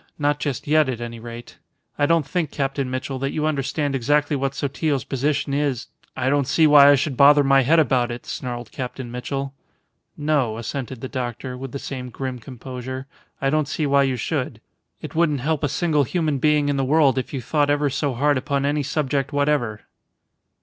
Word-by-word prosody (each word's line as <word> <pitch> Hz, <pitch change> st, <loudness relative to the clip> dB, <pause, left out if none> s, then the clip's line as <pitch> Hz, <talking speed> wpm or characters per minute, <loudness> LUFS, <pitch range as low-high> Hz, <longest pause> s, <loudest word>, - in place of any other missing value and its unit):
Not 145 Hz, 0 st, +1 dB
just 145 Hz, -4 st, -3 dB
yet, 150 Hz, -1 st, +3 dB
at 120 Hz, -3 st, -3 dB
any 115 Hz, -1 st, -6 dB
rate. 120 Hz, +1 st, -10 dB, 0.4 s
I 145 Hz, -, +2 dB
don't 165 Hz, -2 st, +3 dB
think, 165 Hz, +2 st, -1 dB
Captain 135 Hz, -1 st, -2 dB
Mitchell, 130 Hz, +1 st, -4 dB
that 135 Hz, +1 st, -2 dB
you 155 Hz, -, -1 dB
understand 145 Hz, -1 st, -1 dB
exactly 145 Hz, +3 st, +1 dB
what 135 Hz, 0 st, -2 dB
Sotillo's 140 Hz, 0 st, -1 dB
position 140 Hz, +1 st, -1 dB
is 140 Hz, -4 st, -1 dB
" -, -, -27 dB
"I 130 Hz, -, -1 dB
don't 140 Hz, -1 st, +2 dB
see 160 Hz, -, +4 dB
why 145 Hz, -2 st, +8 dB
I 145 Hz, -, +7 dB
should 140 Hz, 0 st, -1 dB
bother 145 Hz, +2 st, +7 dB
my 135 Hz, 0 st, +5 dB
head 150 Hz, +6 st, +3 dB
about 130 Hz, -5 st, +3 dB
it," 120 Hz, 0 st, -6 dB
snarled 120 Hz, -2 st, -5 dB
Captain 125 Hz, -2 st, -6 dB
Mitchell. 135 Hz, +2 st, -4 dB, 0.6 s
"No," 145 Hz, -7 st, 0 dB
assented 125 Hz, +1 st, -5 dB
the 130 Hz, -, -4 dB
doctor, 125 Hz, -1 st, -4 dB
with 130 Hz, 0 st, -7 dB
the 140 Hz, -, -4 dB
same 130 Hz, -2 st, -6 dB
grim 130 Hz, 0 st, -5 dB
composure. 130 Hz, +1 st, -7 dB, 0.3 s
"I 135 Hz, 0 st, +1 dB
don't 155 Hz, -1 st, +1 dB
see 150 Hz, +1 st, -1 dB
why 140 Hz, 0 st, +4 dB
you 135 Hz, -2 st, +1 dB
should. 120 Hz, -, -3 dB, 0.4 s
It -, -, -7 dB
wouldn't 155 Hz, -5 st, +1 dB
help 155 Hz, +2 st, -1 dB
a 145 Hz, -, +1 dB
single 155 Hz, -1 st, +1 dB
human 155 Hz, -1 st, -1 dB
being 150 Hz, 0 st, +3 dB
in 145 Hz, -1 st, 0 dB
the 135 Hz, -, +1 dB
world 140 Hz, -1 st, +3 dB
if 130 Hz, -, -5 dB
you 135 Hz, -, -3 dB
thought 145 Hz, +3 st, 0 dB
ever 145 Hz, -1 st, +2 dB
so 140 Hz, -1 st, -1 dB
hard 145 Hz, +2 st, +2 dB
upon 140 Hz, +1 st, -1 dB
any 145 Hz, +1 st, +1 dB
subject 140 Hz, 0 st, -1 dB
whatever." 145 Hz, -7 st, 0 dB
140 Hz, 200 wpm, -22 LUFS, 130-145 Hz, 0.6 s, why